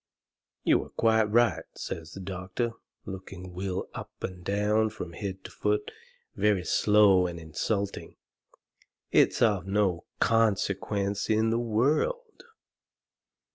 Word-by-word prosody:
"You - - +3
are - - -14
quite 110 -1 +3
right," 115 -3 +3
says 80 -1 -6
the - - -8
doctor, 95 +5 -3 0.3
looking 95 -1 -8
Will 95 +1 -3
up - - -7
and 90 -1 -5
down 105 +3 +2
from 90 -6 -7
head 95 0 -5
to - - -9
foot, 420 +2 -1 0.4
very 100 -4 +2
slow 100 -3 +5
and 85 -1 -6
insulting, 100 +6 -3 1.0
"it's - - +4
of 100 -6 +2
no 95 -4 +1
consequence 100 -2 +1
in 110 +1 +3
the 115 - +1
world." 150 - 0
100 Hz, 120 wpm, -28 LUFS, 95-110 Hz, 1.0 s, slow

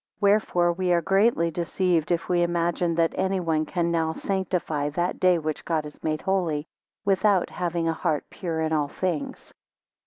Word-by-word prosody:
Wherefore 200 -4 +3
we 180 +1 -1
are 170 - +3
greatly 195 -3 +3
deceived 170 0 0
if 170 -1 0
we 175 -1 +2
imagine 170 0 0
that 165 0 +2
anyone 175 -5 0
can 170 -2 0
now 160 -1 0
sanctify 175 -7 -2
that 175 +4 -2
day 185 -1 +4
which 155 -2 -3
God 160 -2 -1
has 150 0 -11
made 155 -1 -1
holy, 175 -6 0 0.4
without 195 -1 +2
having 170 -2 -2
a 165 - +1
heart 155 -2 -1
pure 165 -4 -3
in 160 0 0
all 150 -2 +1
things. 170 -1 -4
170 Hz, 165 wpm, -25 LUFS, 160-185 Hz, 0.4 s, day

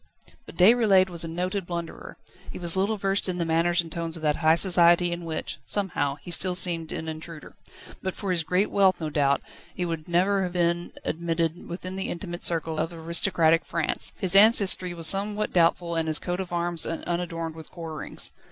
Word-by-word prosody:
But - - -12
Déroulède 190 -1 +4
was 170 -1 -3
a - - -4
noted 180 +3 -3
blunderer. 170 -1 -7 0.3
He - - -8
was 170 -1 +2
little 200 +3 0
versed 195 0 -1
in 180 - -3
the 170 - -1
manners 170 +2 +1
and 165 -1 -11
tones 165 -1 -3
of 160 - -11
that 150 -1 +1
high 160 -1 +4
society 175 -1 +5
in 170 0 -5
which, 160 -1 -4
somehow, 175 -9 0
he 150 +4 -11
still 180 +1 +2
seemed 170 -3 +2
an 160 - -5
intruder. 160 0 -8 0.5
But 190 - -4
for 200 -3 -4
his 170 -2 +1
great 180 +6 0
wealth, 190 -2 +3
no 155 -2 -4
doubt, 140 -1 +1 0.3
he 180 - -2 0.2
never 185 +4 +2
would 195 - 0
have 175 - -6
been 175 -1 0
admitted 165 0 -2
within 185 +2 -6
the 190 - -2
intimate 175 0 -6
circle 160 -2 -1
of 160 - -2
aristocratic 165 0 +1
France. 165 -2 -1
His 190 0 +2
ancestry 195 -4 +5
was 165 -1 -6
somewhat 205 +3 +1
doubtful 170 0 +2
and 165 -1 -1
his 155 -1 +3
coat 175 +3 -4
of 185 -2 -5
arms 175 -1 -1
unadorned 165 -1 -4
with 160 -1 -12
quarterings. 165 -3 -5
175 Hz, 195 wpm, -25 LUFS, 165-185 Hz, 0.5 s, society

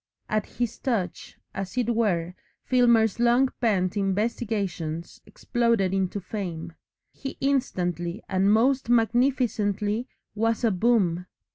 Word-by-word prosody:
At 215 -1 -1
his 240 -1 -3
touch, 205 -9 -3 0.2
as 195 +4 -5
it 240 -1 +1
were, 180 -7 0 0.3
Filmer's 235 -4 +3
long 240 +2 +4
pent 190 -6 +1
investigations 195 -5 -2
exploded 230 -6 0
into 190 +1 -1
fame. 175 -4 -5 0.4
He 270 - -7
instantly 180 - -1
and 190 +1 +2
most 255 +3 +2
magnificently 230 -2 +1 0.3
was 225 +3 0
a 230 - +4
Boom. 185 -4 +1
215 Hz, 110 wpm, -26 LUFS, 185-240 Hz, 0.4 s, long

